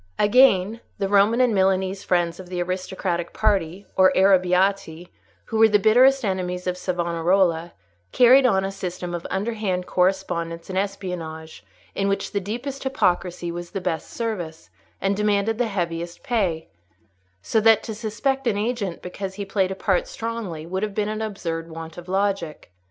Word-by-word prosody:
Again, 215 -1 +4 0.2
the 195 - -1
Roman 205 +4 +4
and 245 -3 +3
Milanese 190 0 +1
friends 175 -1 0
of 185 -1 -10
the 180 -1 -4
aristocratic 180 -1 -3
party, 195 -3 0
or 185 0 +6
Arrabbiati, 185 -2 +2 0.4
who 220 - -2
were 225 0 +7
the 210 - +5
bitterest 250 +5 +4
enemies 180 -2 -2
of 180 -1 -1
Savonarola, 175 -1 0 0.4
carried 255 +2 +6
on 190 -5 +2
a 195 - -3
system 180 -2 -5
of 170 -1 -4
underhand 200 -3 -2
correspondence 180 -2 -1
and 185 - 0
espionage, 180 -5 -5 0.3
in 195 - -1
which 200 0 -1
the 200 - 0
deepest 245 +8 -5
hypocrisy 180 -9 0
was 175 0 -6
the 195 - -4
best 165 -3 -3
service, 180 -9 -5 0.3
and 195 +1 0
demanded 210 +2 +1
the 245 - +2
heaviest 170 -3 -4
pay; 195 -11 -1 0.8
so 220 - +1
that 225 0 +5
to 220 - -5
suspect 240 +5 -2
an 210 -3 +1
agent 210 -4 -2
because 190 +1 -6
he 200 0 -5
played 195 -1 0
a 190 - -4
part - - 0
strongly 225 - -5
would 185 +3 -3
have 210 -2 -3
been 210 0 0
an 215 0 -3
absurd 170 -6 -4
want 165 0 -8
of 175 +1 -10
logic. 190 - -2
190 Hz, 160 wpm, -23 LUFS, 175-215 Hz, 0.8 s, were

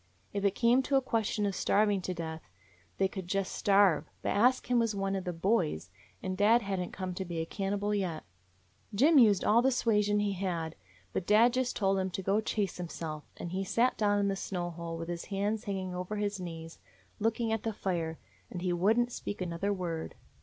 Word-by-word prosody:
If 200 -1 -2
it 200 -1 +2
came 245 +2 +4
to 275 +1 0
a 270 - +5
question 220 -3 0
of 200 - 0
starving 205 0 +2
to 185 - -3
death, 160 -1 -5 0.6
they 190 - +3
could 190 -2 -7
just 195 +1 -1
starve, 195 -6 +3
but - - 0
Ask 250 +6 +3
Him 245 -1 +2
was 230 -2 +1
one 195 0 -1
of 190 -1 -3
the 180 - -1
'boys,' 165 - 0 0.3
and 185 0 -2
dad 215 +4 +4
had 195 -1 -2
n't 180 - -4
come 185 -1 -4
to 190 - -4
be 175 -2 -5
a 160 - -1
cannibal 200 +3 -2
yet. 185 -6 -2 0.7
Jim 290 +7 +6
used 210 -6 +5
all 225 +3 +5
the 265 - +4
suasion 210 -5 +2
he 205 -1 0
had. 175 -4 -2 0.4
But 175 - -2
dad 225 +4 +5
just 255 -1 0
told 195 -1 +2
him 190 0 -1
to 185 +1 -5
go 200 +3 +2
chase 205 -3 -2
himself, 165 -3 -5
and 170 - -6
he 190 +1 -1
sat 235 +6 +2
down 205 -1 +2
in 200 0 +2
the 195 - 0
snow 180 -2 -3
hole 165 0 -6
with 165 0 -5
his 170 -1 -4
hands 205 +3 -2
hanging 190 -3 -3
over 180 +3 -4
his 205 -1 -2
knees, 165 -2 -7 0.4
looking 225 +1 0
at 225 -1 0
the 225 - -2
fire; 170 -6 -2 0.3
and 180 -1 -6
he 180 -1 +1
would 195 +6 +3
n't 240 0 +2
speak 205 - -5
another 180 +2 -2
word. 175 -4 -3
195 Hz, 215 wpm, -31 LUFS, 180-210 Hz, 0.7 s, Jim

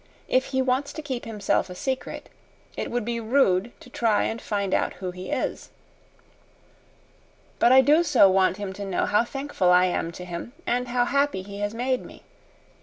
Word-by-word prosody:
"If 260 0 +2
he 265 -1 0
wants 260 +2 0
to 310 - -6
keep 260 -4 -4
himself 210 -4 -1
a 180 - -8
secret, 265 +7 -4 0.5
it - - -4
would 240 -2 -2
be 235 0 -2
rude 225 -3 +2
to - - -13
try 225 -4 +1
and 225 - -3
find 200 -2 -2
out - - +1
who 180 0 -5
he 180 +1 -8
is. - - -3 1.9
But 240 - +5
I 260 +1 +8
do 295 +5 +4
so 285 -11 +5
want 190 0 +3
him 200 -2 -5
to 200 - -7
know 195 -2 -1
how 210 +2 +3
thankful 270 -7 -1
I 180 0 +6
am 175 -2 -1
to 180 - -8
him 175 +7 -7
and 250 +1 0
how 245 0 +1
happy 280 -7 0
he 200 +1 -9
has 205 +2 -2
made 255 +2 -1
me. - - -13
230 Hz, 190 wpm, -25 LUFS, 190-260 Hz, 1.9 s, I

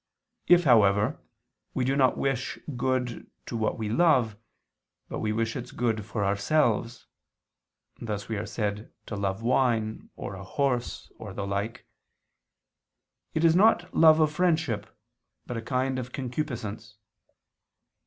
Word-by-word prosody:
If, 175 0 +6
however, 105 - +4 0.6
we 130 - +1
do 135 +2 +1
not 130 -2 +3
wish 135 -1 -1 0.2
good 125 -1 -1 0.2
to - - -6
what 110 -1 0
we 110 - -3
love, 125 -4 +3 0.7
but - - -4
wish 110 +1 -1
its 125 - -5
good 115 -3 -1
for 105 -2 -2
ourselves, 115 +3 +1 1.0
(thus 105 -3 -4
we 110 - -2
are 105 - -4
said 105 -1 -3
to 105 - -5
love 100 +1 -2
wine, 115 -3 +1
or - - -6
a 95 0 -8
horse, 125 +4 -2
or 100 -3 -8
the 100 - -3
like), 100 +3 -3 1.5
it 160 +1 +2
is 165 0 +5
love 185 -2 +4
not 160 -1 +6
of 155 -1 +3
friendship, 155 - 0 0.6
but 125 - -5
of 115 - -3
a - - -17
kind 130 0 0
of 125 0 -6
concupiscence. 115 -6 -5
120 Hz, 140 wpm, -27 LUFS, 105-135 Hz, 1.5 s, If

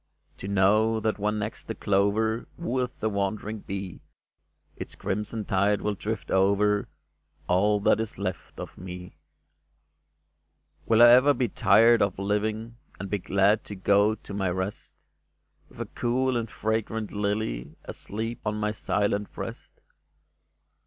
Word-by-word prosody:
To 95 - -7
know 105 +3 +3
that 110 0 -1
when 105 +1 0
next 105 +1 -4
the 110 - -4
clover 105 +3 +1
Wooeth 130 -7 -2
the 110 - 0
wandering 105 +2 -2
bee, 95 -2 -6 0.7
Its - - -7
crimson 105 +2 -3
tide 100 +2 +1
will 105 - 0
drift 110 +3 -5
over 100 +2 +2 0.6
All 105 +4 +3
that 105 - +3
is 110 -1 -4
left 95 -2 -5
of - - -8
me? 90 0 -9 1.7
Will 115 +1 +6
I 120 - +10
ever 130 +4 +6
be 125 -3 0
tired 115 +1 +5
of 100 -2 +1
living. 110 +3 -2 0.2
And 100 0 -6
be 105 - 0
glad 100 +3 +2
to 105 - -7
go 100 +3 +3
to 105 - -11
my 95 -2 0
rest, 95 +3 -5 0.6
With - - -17
a - - -2
cool 130 +2 0
and 115 -2 -2
fragrant 110 0 -2
lily 100 - -2
Asleep 115 +3 -5
on 105 - -1
my 105 0 -1
silent 105 -1 -1
breast - - -8
105 Hz, 140 wpm, -26 LUFS, 100-110 Hz, 1.7 s, I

